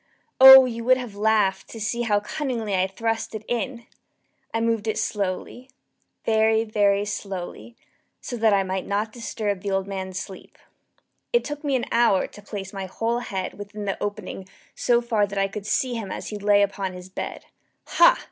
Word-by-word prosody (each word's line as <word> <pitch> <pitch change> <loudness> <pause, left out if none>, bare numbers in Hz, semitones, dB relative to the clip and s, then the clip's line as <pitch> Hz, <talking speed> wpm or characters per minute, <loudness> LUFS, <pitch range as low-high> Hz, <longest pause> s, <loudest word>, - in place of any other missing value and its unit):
Oh, 265 0 +11
you 235 -2 -4
would 255 +1 +5
have 245 -5 -6
laughed 210 -2 +1
to 225 - -9
see 225 +2 -2
how 210 -3 +2
cunningly 225 -1 -3
I 185 0 +2
thrust 225 +3 -3
it 215 0 -7
in! 240 0 -3 0.7
I 225 - -1
moved 225 -1 0
it 220 - -1
slowly 205 +5 -3 0.6
very, 220 0 +3
very 205 -2 +2
slowly, 200 +2 -6 0.4
so 245 - -6
that 220 -1 +3
I 200 -1 +3
might 190 0 -3
not 210 +2 -1
disturb 210 -5 -3
the 200 - -3
old 195 -1 0
man's 190 -1 -5
sleep. 190 0 -9 0.7
It 480 - +3
took 295 0 -6
me 280 -2 0
an 250 - 0
hour 230 -5 +3
to 205 - -12
place 200 -2 -7
my 195 -1 -5
whole 230 +5 -1
head 190 -5 -5
within 205 +1 -7
the 195 - -3
opening 205 -2 -5 0.2
so 240 -1 +2
far 220 -4 +1
that 200 0 -7
I 195 0 +2
could 200 +1 -7
see 255 +2 0
him 220 -5 -5
as - - -5
he 210 - -5
lay 205 0 +4
upon 195 -1 -2
his 180 0 -9
bed. 190 - -6 0.4
Ha! - - +5
210 Hz, 185 wpm, -24 LUFS, 195-230 Hz, 0.7 s, Oh